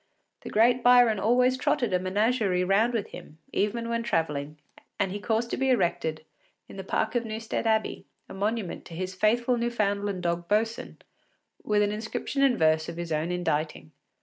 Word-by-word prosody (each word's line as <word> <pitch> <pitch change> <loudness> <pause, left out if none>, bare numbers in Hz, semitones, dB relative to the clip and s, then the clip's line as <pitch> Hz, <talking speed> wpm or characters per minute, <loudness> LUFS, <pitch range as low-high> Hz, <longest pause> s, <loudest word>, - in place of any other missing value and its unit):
The - - -8
great 240 +3 +3
Byron 245 -3 +5
always 250 +4 +3
trotted 240 -4 0
a 180 - +3
menagerie 200 0 +1
round 200 +6 +3
with 225 -4 -2
him, 150 - -11 0.2
even 230 +3 -1
when 230 0 -1
travelling, 150 -8 -2 0.4
and 195 -2 0
he 205 - -4
caused 225 +2 -1
to - - -1
be 265 0 +1
erected, 160 -9 0 0.4
in - - -12
the 190 - -5
park 220 +3 -1
of 240 -1 0
Newstead 225 +1 -3
Abbey, 220 -1 0 0.2
a - - -10
monument 205 -1 -2
to 165 - -10
his 185 +2 -4
faithful 235 +5 +2
Newfoundland 205 -5 -1
dog 170 0 -1
Boatswain, 225 +3 -1 0.7
with 210 -1 +2
an 205 - 0
inscription 220 +6 -3
in 270 -3 +4
verse 155 0 +2
of 165 - -7
his 170 -1 -5
own 155 +3 -1
inditing. 155 - -2
210 Hz, 175 wpm, -27 LUFS, 180-235 Hz, 0.7 s, Byron